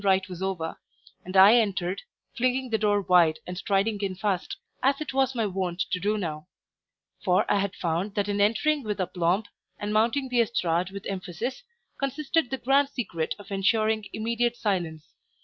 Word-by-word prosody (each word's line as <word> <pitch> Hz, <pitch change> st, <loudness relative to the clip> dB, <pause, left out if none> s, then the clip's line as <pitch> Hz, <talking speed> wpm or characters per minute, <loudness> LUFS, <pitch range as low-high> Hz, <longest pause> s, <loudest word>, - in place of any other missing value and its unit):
rite 190 Hz, -1 st, +3 dB
was 180 Hz, -1 st, -8 dB
over; 185 Hz, -4 st, -3 dB, 0.4 s
and 185 Hz, +1 st, -2 dB
I 200 Hz, +5 st, +9 dB
entered, 195 Hz, -4 st, 0 dB, 0.3 s
flinging 255 Hz, 0 st, 0 dB
the 220 Hz, -, +1 dB
door 205 Hz, -1 st, +2 dB
wide 175 Hz, -3 st, +4 dB
and 180 Hz, -, -6 dB
striding 200 Hz, +3 st, 0 dB
in 195 Hz, -2 st, -2 dB
fast, 195 Hz, -1 st, -2 dB, 0.2 s
as 275 Hz, +1 st, +2 dB
it 305 Hz, -3 st, -5 dB
was 265 Hz, -1 st, +1 dB
my 225 Hz, -2 st, +1 dB
wont 185 Hz, -2 st, -2 dB
to 180 Hz, -, 0 dB
do 210 Hz, +3 st, 0 dB
now; 155 Hz, -4 st, -4 dB, 0.8 s
for 185 Hz, -2 st, +3 dB
I 205 Hz, -, +2 dB
had 200 Hz, 0 st, -2 dB
found 175 Hz, +4 st, -2 dB
that 205 Hz, -1 st, 0 dB
in 205 Hz, 0 st, 0 dB
entering 285 Hz, +9 st, +2 dB
with 210 Hz, -4 st, -4 dB
aplomb, 180 Hz, +2 st, +1 dB, 0.3 s
and 205 Hz, 0 st, -3 dB
mounting 235 Hz, +5 st, +2 dB
the 245 Hz, -1 st, +3 dB
estrade 180 Hz, -6 st, 0 dB
with 195 Hz, 0 st, -8 dB
emphasis, 195 Hz, -, -4 dB, 0.4 s
consisted 280 Hz, +2 st, 0 dB
the 265 Hz, -, -2 dB
grand 275 Hz, +2 st, +3 dB
secret 185 Hz, -, -3 dB
of 205 Hz, 0 st, -13 dB
ensuring 215 Hz, +2 st, +1 dB
immediate 235 Hz, +2 st, -1 dB
silence. 170 Hz, -8 st, -2 dB
205 Hz, 175 wpm, -27 LUFS, 185-235 Hz, 0.8 s, I